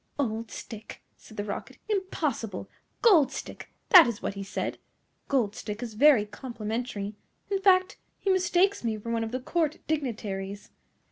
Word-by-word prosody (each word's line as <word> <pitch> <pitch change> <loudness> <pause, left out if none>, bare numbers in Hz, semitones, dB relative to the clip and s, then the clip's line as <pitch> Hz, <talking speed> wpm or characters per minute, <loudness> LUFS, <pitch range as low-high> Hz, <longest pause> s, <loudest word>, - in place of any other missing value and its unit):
"OLD 225 -4 -2
Stick!" 220 -1 -9
said 215 - -16
the 205 - -1
Rocket, 200 -1 -6
"impossible! 310 - -2 0.4
GOLD 340 - +6
Stick, - - -7 0.2
that 360 - +10
is 235 -3 -3
what - - -3
he 200 - -6
said. 195 - -3 0.5
Gold 235 -7 +1
Stick 210 +2 -5
is 230 -2 -6
very 255 -2 +6
complimentary. 220 -1 -4 0.4
In 390 -1 +1
fact, 375 -1 +4 0.2
he 390 - 0
mistakes 375 +1 +2
me 225 -2 -1
for 230 +2 -6
one 230 -1 0
of 225 - -4
the 255 - -2
Court 310 +3 0
dignitaries!" 205 -9 -3
235 Hz, 155 wpm, -28 LUFS, 210-325 Hz, 0.5 s, that